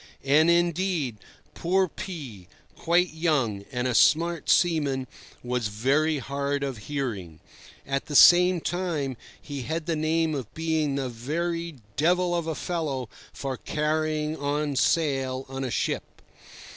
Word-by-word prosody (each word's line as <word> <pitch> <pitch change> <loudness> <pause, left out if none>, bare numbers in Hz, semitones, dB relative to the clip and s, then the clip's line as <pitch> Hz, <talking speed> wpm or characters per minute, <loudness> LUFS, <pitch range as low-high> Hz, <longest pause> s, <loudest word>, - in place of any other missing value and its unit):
And, 155 +4 +5
indeed, 170 - +1 0.4
poor 185 +2 +1
P—, 140 - -8 0.3
quite 175 +1 +2
young, 135 - 0
and 125 -1 -1
a 125 - 0
smart 165 +5 +3
seaman, 145 -7 +2 0.4
was 125 -2 -1
very 140 +9 +1
hard 140 +1 -2
of 135 -5 -3
hearing. 110 - -4 0.5
At 135 0 -2
the 145 - -5
same 180 +2 +7
time, 165 -8 -2 0.2
he 140 -2 -6
had 160 +5 -3
the 170 -1 0
name 160 +1 +1
of 130 -7 -5
being 160 -3 0
the 135 -2 -1
very 165 +7 -3 0.2
devil 175 +3 +2
of 170 -2 -1
a 160 - -2
fellow 145 -10 -3 0.2
for 135 -2 -4
carrying 155 0 -1
on 145 0 -1
sail 135 -3 +1
on 135 0 -5
a 130 - -2
ship. - - -3
150 Hz, 135 wpm, -26 LUFS, 135-165 Hz, 0.5 s, same